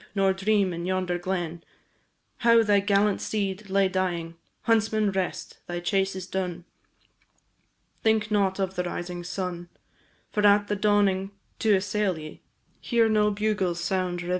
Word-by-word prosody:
nor 195 -1 +3
dream 195 -1 +1
in 170 +1 -4
yonder 185 -1 -1
glen, 175 -2 -3 0.7
How 230 -1 +5
thy 205 -2 +4
gallant 200 0 +2
steed 200 -1 -3
lay 195 0 +3
dying. 180 -3 -2 0.3
Huntsman, 220 -2 +2
rest! 190 -1 -3
thy 175 0 -3
chase 195 +2 0
is 185 -1 -5
done, 180 -2 -4 1.4
Think 220 -1 +1
not 195 -2 +2
of 190 -1 -1
the 180 - -1
rising 175 0 -5
sun, 175 -1 -5 0.6
For 210 - 0
at 205 0 +3
dawning 200 -2 +2 0.3
to 215 -2 +4
assail 195 -1 0
ye, 155 -1 -10 0.4
Here 235 -2 +2
no 210 -1 +3
bugles 205 -4 -1
sound 180 -1 -1
reveillé. 175 - -6
190 Hz, 140 wpm, -26 LUFS, 180-210 Hz, 1.4 s, How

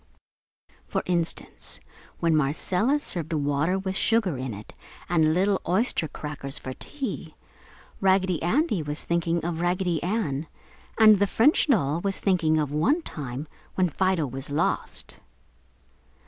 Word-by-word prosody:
For - - -1
instance, 170 -2 -2 0.4
when 165 -1 +2
Marcella 180 - +1
served 170 - -4
water 145 +4 +1
with 190 0 -3
sugar 220 -6 +2
in 130 -1 -4
it 105 0 -9 0.3
and 160 -3 +3
little 195 +2 +2
oyster 185 -3 +1
crackers 145 -2 -6
for 130 - -6
"tea," 205 - -6 0.6
Raggedy 190 -3 +2
Andy 215 - +1
was 150 0 -4
thinking 170 0 0
of 170 -1 -2
Raggedy 175 -2 0
Ann, 170 -7 -1 0.5
and 215 -3 +7
the 200 - +3
French 265 +12 +4
doll 170 - +2
was 195 0 -2
thinking 170 -5 +2
of 150 -2 0
one 180 - +2
time 135 - -5 0.3
when 185 -2 +2
Fido 185 -1 +1
was 135 +2 -6
lost. 150 +4 -2
170 Hz, 135 wpm, -26 LUFS, 150-195 Hz, 0.6 s, and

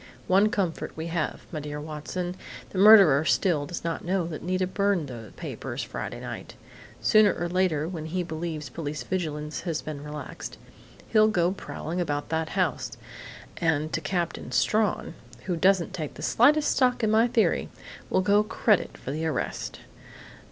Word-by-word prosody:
One 195 +3 +4
comfort 185 -7 -2
we 160 - -4
have, 170 -3 -2
'my 155 - -3
dear 150 0 -5
Watson': 155 +4 -4 0.4
the 185 - -3
murderer 195 -9 +8
still 160 -3 +2
does 175 - -6
not 165 0 -3
know 180 0 0
that 160 -3 -6
Nita 185 +2 0
burned 185 -5 0
the 115 -4 -8
papers - - -5
Friday - - -5
night. - - -7 0.5
Sooner 215 -1 +5
or 175 - -2
later, 175 -4 +1
when 165 -3 -5
he 180 +2 -1
believes 160 -2 -4
police 145 +3 -5
vigilance 155 -5 -3
has 165 -3 -3
been 150 -2 -6
relaxed, 150 -1 -7 0.5
he'll 215 -1 +5
go 180 -4 +2
prowling 180 -2 -4
about 145 -4 -2
that 160 0 -1
house, 180 -7 -1 0.6
and 155 -2 0
to - - 0
Captain 175 -8 -2
Strawn, 175 - +1 0.3
who 180 - -1
doesn't 185 +1 +3
take 155 -4 -5
the - - -8
slightest 295 +6 +4
stock 250 -2 +2
in 215 - +3
my 225 +2 +5
theory, 235 -2 +1 0.4
will - - +2
go 205 +2 +4
credit 210 -1 +1
for 135 - -6
the 160 +3 -2
arrest.... 155 - -3
170 Hz, 165 wpm, -27 LUFS, 155-195 Hz, 0.6 s, murderer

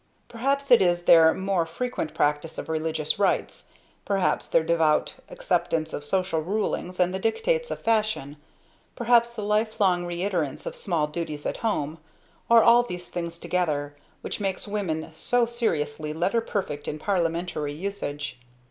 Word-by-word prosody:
Perhaps 275 +4 -1
it 240 - +8
is 175 -1 +2
their 165 -2 +7
more 190 0 0
frequent 165 -3 -4
practice 150 +1 0
of - - -5
religious 160 +1 -1
rites, 200 - 0 0.4
perhaps 195 -2 0
their 160 - +3
devout 160 -2 +2 0.2
acceptance 335 - -1
of 145 - -4
social 180 +1 0
rulings 185 0 -2
and 180 0 +2
the 190 - -2
dictates 480 - 0
of - - -5
fashion, 215 -11 0 0.6
perhaps 235 0 +4
the 235 -3 -7
lifelong 210 -4 +1
reiterance 175 -4 -2
of - - -5
small 170 -6 0
duties 150 -1 -5
at - - -2
home, 160 -8 -2 0.5
or 230 -1 +7
all 235 +1 +7
these 180 -7 -7
things 170 -1 -4
together, 155 -5 -1 0.3
which - - -4
makes 195 0 -2
women 185 -7 -2
so 245 +8 +1
seriously 155 -11 -2
letter 185 +8 +1
perfect 180 -10 -4
in 150 - -3
parliamentry 170 -4 -1
usage. 145 -5 -5
180 Hz, 150 wpm, -26 LUFS, 155-215 Hz, 0.6 s, it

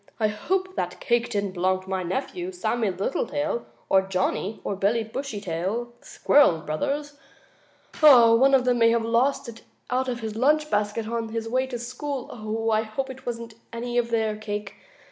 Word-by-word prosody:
"I 215 -1 +2
hope 375 - -2
that - - -3
cake 240 -2 +1
didn't 200 -4 -1
belong 185 +1 0
to 190 - -14
my 190 -1 0
nephew, 280 - -3
Sammie 240 - -1
Littletail, 235 +7 -2 0.2
or 190 - +5
Johnnie 190 +2 -2
or 200 - -2
Billie 210 +4 +1
Bushytail, 220 -2 -4
the - - -24
squirrel 230 - +4
brothers. 285 - -3 0.8
One 265 -2 +7
of 255 -2 +2
them 245 -1 +2
may 230 0 +6
have 230 -1 +1
lost 240 +4 +1
it 230 -1 -9 0.3
out 260 +1 +1
of 240 -1 -3
his 220 -1 -4
lunch 300 +5 +2
basket 210 +1 0
on 230 0 -3
his 225 0 -3
way 255 +3 0
to 250 -2 -4
school. 255 +3 -5 0.4
I 215 0 +3
hope 225 +5 -4
it 260 0 -13
wasn't 230 -1 -5 0.2
any 240 +1 -1
of 235 -1 -1
their 220 -2 0
cake. 210 -1 -5
230 Hz, 175 wpm, -25 LUFS, 210-260 Hz, 0.8 s, One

